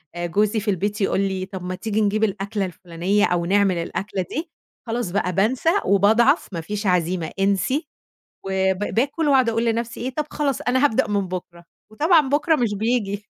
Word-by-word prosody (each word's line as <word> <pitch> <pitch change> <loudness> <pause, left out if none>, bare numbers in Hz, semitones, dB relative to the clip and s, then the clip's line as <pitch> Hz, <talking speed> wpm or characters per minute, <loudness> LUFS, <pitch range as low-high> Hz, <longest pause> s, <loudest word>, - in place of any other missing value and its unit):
آآ 175 - -3
جوزي 210 +5 +1
في 210 0 -1
البيت 205 +3 -2
يقول 195 - +1
لي 190 -1 -2
طَب 190 -1 -8
ما 185 +1 -4
تيجي 215 +2 -2
نجيب 210 +1 +1
الأكلة 200 0 -1
الفلانية 180 +3 -1
أو 175 -1 0
نعمل 195 -1 +2
الأكلة 190 +2 -3
دي، 325 +3 -4 0.4
خلاص 225 -5 -2
بقى 185 -2 -1
بانسى 235 - +1 0.2
وباضعَف، 220 - +3
ما 165 - -3
فيش 205 +3 -4
عزيمة، 175 -2 0
انسي 200 - +1 0.6
و 190 0 +1
ب - - -11 0.2
باكُل 285 +6 +1
وأقعُد 260 -4 +4
أقول 230 +1 0
لنفسي 230 0 -2
إيه 255 +2 -2
"طَب 300 -1 -2
خلاص 280 -4 -1
أنا 260 +3 +1
هابدأ 225 -7 +2
من 200 -3 -1
بُكرة." 175 -1 -7 0.3
وطبعًا 310 +3 +3
بُكرة 305 +3 +2
مش 230 -5 0
بييجي. 205 -2 -1
205 Hz, 185 wpm, -22 LUFS, 190-240 Hz, 0.6 s, وأقعُد